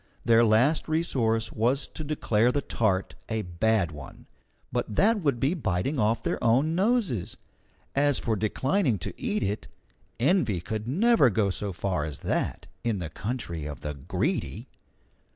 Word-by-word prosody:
Their 115 0 +6
last 120 +8 +3
resource 120 -9 0
was 125 +6 +1
to 155 - -7
declare 125 -6 +1
the 145 - 0
tart 95 -4 0 0.2
a 110 -1 -1
bad 90 +1 +1
one, 75 -3 -11 0.5
but 105 - -2
that 220 +2 +4
would 140 -7 +1
be 135 +7 +2
biting 125 - -1
off 110 +1 +1
their - - -2
own 130 +8 +3
noses. 195 - 0 0.6
As 145 0 +3
for 115 - 0
declining 130 - +1
to - - -5
eat 215 -4 -2
it, 105 +2 -2 0.5
envy 130 - +2
could 105 +5 -4
never 200 - +4
go 105 -2 +1
so 100 +2 -3
far 90 -3 -2
as 75 -2 -5
that - - -1 0.2
in 115 -3 0
the 85 -4 -5
country 90 - -4
of 75 -4 -7
the 75 - -4
Greedy. 70 -2 -2
115 Hz, 155 wpm, -27 LUFS, 100-145 Hz, 0.6 s, Their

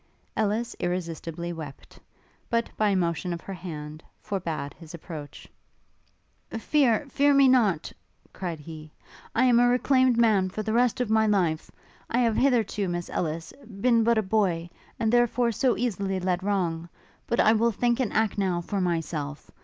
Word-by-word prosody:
Ellis 220 +2 -1
irresistibly 170 -1 -3
wept, 150 -4 -10 0.5
but, 230 -1 0
by 215 -1 +2
a 200 - +2
motion 175 -1 -1
of 170 - -6
her 195 - -7
hand, 155 -4 -7 0.2
forbad 165 -8 -4
his 165 0 -11
approach. 155 -3 -9 1.0
'Fear, 250 +2 +2
fear 285 +1 +3
me 275 -1 +6
not!' 215 -11 +2 0.4
cried 175 -4 -5
he, 155 0 -10 0.5
'I 255 - +4
am 240 -2 +5
a 245 - +5
reclaimed 255 0 +3
man 210 -5 +3
for 215 +3 -4
the 220 - -2
rest 245 +1 +2
of 230 -3 -1
my 220 0 +4
life! 175 -7 +1 0.4
I 235 - 0
have 230 -2 +2
hitherto, 230 -6 +1
Miss 175 0 -4
Ellis, 165 0 -3 0.3
been 235 0 +3
but 235 0 +3
a 220 - +2
boy, 185 -4 0 0.3
and 220 0 +1
therefore 240 0 +3
so 250 +3 +1
easily 195 -5 -1
led 180 0 -1
wrong. 175 -4 -1 0.4
But 235 - 0
I 220 - +6
will 230 +1 +2
think 240 +3 0
and 250 -5 0
act, 220 -2 0
now, 185 -3 +1
for 195 +3 -3
myself. 160 -4 -3
195 Hz, 165 wpm, -26 LUFS, 170-235 Hz, 1.0 s, me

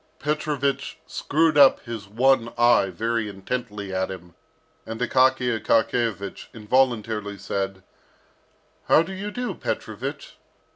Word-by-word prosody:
Petrovich 145 -2 -1
screwed 155 0 +1
up 140 -2 +7
his 115 -4 -7
one 120 +2 +2
eye 120 -4 +4
very 115 +4 -2
intently 105 0 -5
at 95 0 -1
him, 90 -2 -9 0.5
and 115 0 -7
Akaky 130 -1 +3
Akakiyevich 110 -3 0
involuntarily 110 -3 0
said, 95 0 -4 1.0
"How 160 - +5
do 190 - -7
you 200 +2 -5
do, 245 +3 -3
Petrovich?" - - -5
115 Hz, 110 wpm, -24 LUFS, 100-135 Hz, 1.0 s, up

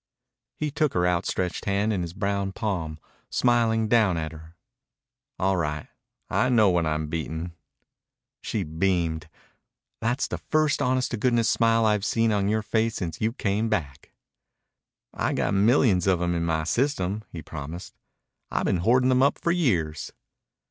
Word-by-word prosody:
He 150 -1 -2
took 150 -1 0
her 90 0 +2
outstretched 90 +1 -1
hand 105 +2 +1
in 95 - -1
his 85 0 -5
brown 100 -1 -1
palm, 85 -9 -3 0.3
smiling 115 -2 +2
down 105 -6 +3
at 80 -1 -3
her. 80 +1 -13 0.8
"All 95 0 +1
right. 75 -3 -3 0.4
I 130 - +1
know 110 -6 +5
when 85 -2 +1
I'm 75 0 -1
beaten." 80 +2 -4 0.9
She 105 - -2
beamed. 80 -1 -1 0.7
"That's 120 +4 0
the - - -4
first 155 -1 +1
honest 130 0 +1
to 120 - -2
goodness 115 -1 +2
smile 115 -1 +3
I've 105 -2 +2
seen 115 +1 +1
on 100 -2 +1
your 110 0 0
face 110 +1 0
since 85 -4 -4
you 110 +1 +1
came 105 0 -1
back." 75 -9 -3 1.0
"I've - - -1
got - - 0
millions 100 -2 +3
of 95 -3 +3
'em 85 0 0
in 85 -1 -1
my 80 -1 0
system," 105 - 0
he 85 - -7
promised. 80 +3 -7 0.6
"I've - - -1
been - - +2
hoarding 125 +8 +3
them 130 0 +3
up 140 - +3
for 170 - 0
years." 90 - 0
100 Hz, 160 wpm, -25 LUFS, 85-115 Hz, 1.0 s, know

